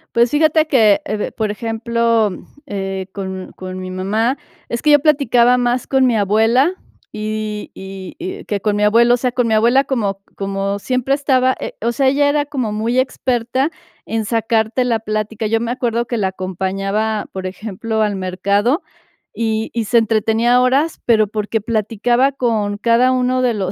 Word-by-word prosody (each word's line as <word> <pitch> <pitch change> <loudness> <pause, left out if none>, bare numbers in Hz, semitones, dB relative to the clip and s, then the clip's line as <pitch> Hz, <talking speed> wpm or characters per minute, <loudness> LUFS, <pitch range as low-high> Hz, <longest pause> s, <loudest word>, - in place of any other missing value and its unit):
Pues 235 0 +4
fíjate 310 +2 +3
que, 220 -8 +4
eh, 210 +1 -3
por 215 -2 -2
ejemplo, 230 0 0 0.4
eh, 195 -5 -4
con 190 -2 -6
con 185 0 -7
mi 185 0 -6
mamá, 215 +8 0 0.3
es 235 - -3
que 300 - +3
yo 290 - +7
platicaba 250 -5 +3
más 245 0 0
con 265 -1 +3
mi 235 -3 +2
abuela 225 - +3 0.4
y 215 0 -4
y 190 -1 -9
y 375 +3 -6
que 205 - -2
con 205 +1 0
mi 205 - 0
abuelo, 235 +3 +5
o 245 - +3
sea, 250 0 -1
con 245 -1 0
mi 220 - +1
abuela 240 +5 +4
como 205 -8 -1 0.2
como 195 0 -2
siempre 255 +3 -1
estaba, 260 -2 +2
eh, - - -5
o 235 +1 0
sea, 270 +1 +3
ella 285 +2 +2
era 290 0 +2
como 255 -7 -3
muy 230 +4 0
experta 260 +2 0 0.3
en 225 0 -2
sacarte 225 +2 0
la 235 -3 0
plática. 215 0 -3
Yo 225 +1 +1
me 235 - -2
acuerdo 235 -2 -1
que 235 - -3
la 195 - +1
acompañaba, 195 +3 -2
por 190 -1 -5
ejemplo, 220 +3 -4
al 210 -2 0
mercado 200 - 0 0.5
y 220 -1 -2
y 230 -2 -1
se 235 - +2
entretenía 225 +2 +2
horas, 270 +6 +1
pero 220 -3 +4
porque 215 +1 -2
platicaba 230 +4 +1
con 220 -6 -1
cada 235 +4 +3
uno 255 0 +1
de 245 -2 +2
los 190 -4 -2
225 Hz, 175 wpm, -18 LUFS, 210-250 Hz, 0.5 s, yo